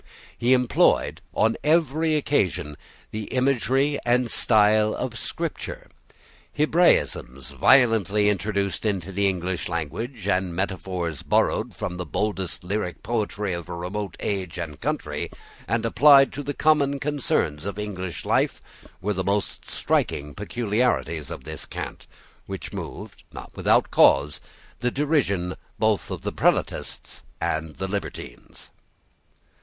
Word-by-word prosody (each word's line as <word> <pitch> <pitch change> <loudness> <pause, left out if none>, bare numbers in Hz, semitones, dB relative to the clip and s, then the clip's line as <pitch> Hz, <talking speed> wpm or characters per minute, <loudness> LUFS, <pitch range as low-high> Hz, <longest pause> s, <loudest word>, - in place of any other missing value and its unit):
He 120 +2 +3
employed, 125 -2 +3
on 110 +1 +2
every 155 0 +2
occasion, 95 - 0 0.4
the 110 0 -4
imagery 135 +3 +1
and 120 -1 +2
style 110 -1 +4
of 125 -2 -4
Scripture. - - -5 0.6
Hebraisms 150 - +2
violently 110 -6 +4
introduced 100 -1 0
into 95 -4 -1
the 100 +1 +1
English 90 -2 -2
language, 100 - -4
and 90 -3 0
metaphors 90 -4 -3
borrowed - - +1
from 90 - -4
the 90 - -4
boldest 95 -2 -2
lyric 90 -2 -3
poetry 105 -3 -1
of 85 -1 -6
a 85 - -4
remote 95 +4 -4
age 95 -4 -3
and 75 -5 -6
country, - - -2 0.4
and 115 +1 0
applied 135 +3 +6
to 145 - -4
the 145 0 -4
common 145 -2 +3
concerns 125 - 0
of 100 - -4
English 95 -5 -5
life, - - +1 0.4
were 105 +2 +1
the 95 -1 -2
most 100 +1 -2
striking 75 0 -1
peculiarities 105 - -1
of - - -7
this - - -7
cant, - - -7 0.4
which - - -6
moved, - - -7
not - - -9
without - - +3
cause, 70 +1 +4 0.4
the 125 +2 +1
derision 125 - 0 0.2
both 110 -2 +1
of - - -5
Prelatists - - -1 0.2
and 80 -1 -2
libertines. 95 -10 -6
105 Hz, 125 wpm, -24 LUFS, 90-125 Hz, 0.6 s, applied